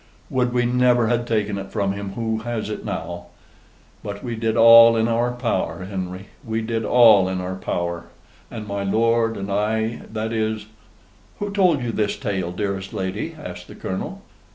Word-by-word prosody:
Would 125 -2 +1
we 120 0 +1
never 125 -1 +3
had 120 0 0
taken 105 -3 0
it 95 0 -8
from 100 -3 0
him 100 0 -5
who 110 0 -2
has 115 -2 -4
it - - -5
now. 85 0 -5 0.8
But 100 0 -6
we 120 -2 -3
did 110 0 -1
all 115 0 +9
in 110 0 +2
our 120 +1 +1
power, 95 -8 -2
Henry: 95 0 -6
we 110 -1 -2
did 115 0 -2
all 110 -5 +6
in 95 0 -2
our 90 +1 -4
power; 85 -2 -3 0.4
and 110 -3 -7
my 100 -1 -3
lord 115 +3 +2
and 100 0 -5
I 110 +3 0
that 110 +1 -3
is 110 -1 -1 0.4
" - - -31
"Who 205 0 -3
told 180 -9 +3
you 120 - -1
this 105 -2 -1
tale, 95 -7 -2
dearest 95 +1 -3
lady?" 105 - -3
asked 90 -10 -8
the - - -11
Colonel. 95 - -5
110 Hz, 180 wpm, -22 LUFS, 95-115 Hz, 0.8 s, all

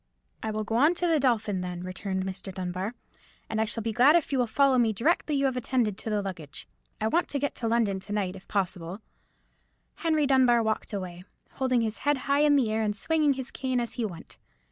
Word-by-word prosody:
"I 220 - -3
will 215 0 -2
go 225 +2 -1
on 300 +7 +4
to 355 - -1
the 325 -3 +3
Dolphin, 220 -7 +1
then," 180 -1 -5
returned 190 +1 -3
Mr. 190 0 -6
Dunbar; 185 +4 -4 0.5
"and 220 0 -1
I - - +2
shall 225 0 -2
be 225 - -1
glad 260 +8 +6
if 335 -4 +1
you 270 - +1
will 245 - +2
follow 265 +3 +3
me 225 -2 +3
directly 300 - +1
you 275 0 +2
have 265 -2 +1
attended 245 -4 0
to - - -5
the 210 -1 0
luggage. 170 -7 -7 0.3
I 215 - 0
want 340 +10 +1
to 285 - -1
get 285 +1 -1
to 230 - -2
London 225 -4 +1
to 200 - -10
night, 195 -3 -1
if 190 - -13
possible." 185 -1 -2 1.0
Henry 315 -3 +1
Dunbar 255 -4 +4
walked 220 0 -1
away, 180 -3 -5 0.3
holding 255 -3 +1
his 220 -1 -2
head 290 -1 +1
high 280 +1 +3
in 295 -1 +5
the 245 -6 +2
air, 220 +1 0
and 210 -1 0
swinging 310 +3 +2
his 265 -1 -6
cane 260 -2 -1
as 235 -1 -3
he 240 - -3
went. 175 -7 -7
225 Hz, 230 wpm, -27 LUFS, 195-270 Hz, 1.0 s, glad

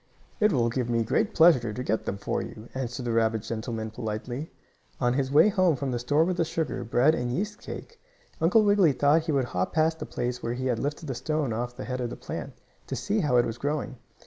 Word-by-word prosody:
"It 210 0 +4
will 120 -6 +2
give 120 0 -2
me 115 -1 +2
great 215 - 0
pleasure 145 -9 +5
to 125 +4 -4
get 110 -2 -1
them 100 - -2
for 100 - -2
you," 110 +2 -9
answered 125 -1 -4
the 120 - -1
rabbit 110 -1 +1
gentleman 110 -1 -4
politely. 120 +7 -4 0.5
On 120 -1 +2
his 135 0 0
way 150 +8 +7
home 185 -6 +3
from 135 0 -3
the 120 - -1
store 145 +6 +2
with 180 0 -1
the 170 - +3
sugar, 160 -5 -2
bread 120 +6 +3
and 125 -5 -2
yeast 210 +9 -3
cake, 465 - -9 0.4
Uncle 200 +7 +5
Wiggily 205 -7 +4
thought 150 +5 +3
he - - +1
would 135 -3 +2
hop 90 -6 -2
past 160 0 +2
the - - -5
place 125 0 -3
where 115 - -2
he 130 +1 -4
had 120 -3 0
lifted 145 +3 -3
the 135 - -3
stone 140 0 -1
off 120 +2 -3
the - - -5
head 125 +2 -3
of 120 - -2
the - - -6
plant, - - -6 0.3
to - - -3
see 210 +2 -1
how 145 -9 +2
it 120 - +4
was 115 +1 -5
growing. 145 -2 -2
130 Hz, 240 wpm, -27 LUFS, 120-160 Hz, 0.5 s, way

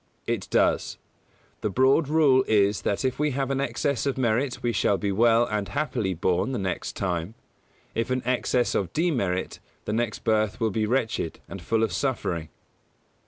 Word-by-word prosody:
It - - -2
does. - - +1 0.6
The 105 - 0
broad 130 - +3
rule 145 -4 +4
is 100 -1 +3
that 100 +6 -1
if 130 +1 -1
we 150 -2 +1
have 135 -1 -1
an 135 0 0
excess 140 -1 -1
of 135 - -1
merit 125 +1 0
we 120 - +1
shall 100 - +2
be 100 0 -1
well 115 +3 +4
and 105 -3 -2
happily 115 -11 -2
born 90 +9 0
the - - -1
next 95 -3 -3
time; 90 +2 -2 0.6
if 115 +1 -1
an 130 0 -1
excess 125 -1 +1
of 90 -4 -1
demerit, 120 - -1 0.3
our 105 - -2
next 115 -2 -2
birth 110 -2 +1
will 110 -1 +1
be 110 +2 0
wretched 115 -8 -1
and 95 - -8
full 110 +6 +1
of 110 - 0
suffering. 90 - -2
115 Hz, 175 wpm, -26 LUFS, 100-130 Hz, 0.6 s, rule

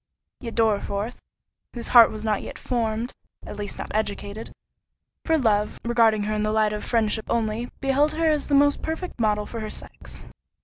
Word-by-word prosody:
Yet 230 -3 -7
Dorriforth, 215 0 0 0.6
whose 235 - -5
heart 235 -2 +8
was 215 0 -6
not 215 -2 -2
formed 230 -1 -2 0.3
(at - - -7
least 205 -1 -6
not - - -6
educated) 210 0 -3 0.7
for 325 -1 +3
love, 210 -6 +1
regarding 225 -3 +3
her 215 +1 -1
in 210 - -1
the 215 0 0
light 215 -1 +2
of 210 - -4
friendship 220 -2 0
only, 230 +1 -1
beheld 280 +2 +2
her 325 +1 0
as 305 -2 +2
the 285 - +2
most 285 +1 +4
perfect 320 -1 -5
model 210 -2 +1
for 230 - -6
her 215 -1 -4
sex. - - -8
225 Hz, 175 wpm, -24 LUFS, 215-250 Hz, 0.7 s, heart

